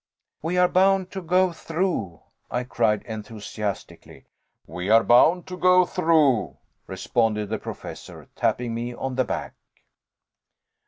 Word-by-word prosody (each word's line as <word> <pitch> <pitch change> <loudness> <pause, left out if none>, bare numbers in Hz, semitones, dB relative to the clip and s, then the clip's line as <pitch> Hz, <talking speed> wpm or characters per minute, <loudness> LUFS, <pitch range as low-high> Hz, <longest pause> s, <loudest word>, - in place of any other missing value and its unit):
"We 170 +3 -2
are 180 0 +5
bound 190 0 +2
to 190 - -5
go 180 +2 +2
through," 160 - -3 0.3
I 125 - -2
cried, 115 -4 0
enthusiastically. 105 -2 -7 0.4
"We 90 +2 -5
are 115 +1 +6
bound 165 +9 +4
to 180 - -6
go 180 0 +5
through," 155 -10 +2 0.3
responded 110 -3 -1
the 110 -1 -2
Professor, - - -9
tapping 120 -2 -1
me 120 +1 -4
on 135 +1 -4
the 130 0 0
back. - - -4
125 Hz, 125 wpm, -24 LUFS, 110-180 Hz, 0.4 s, are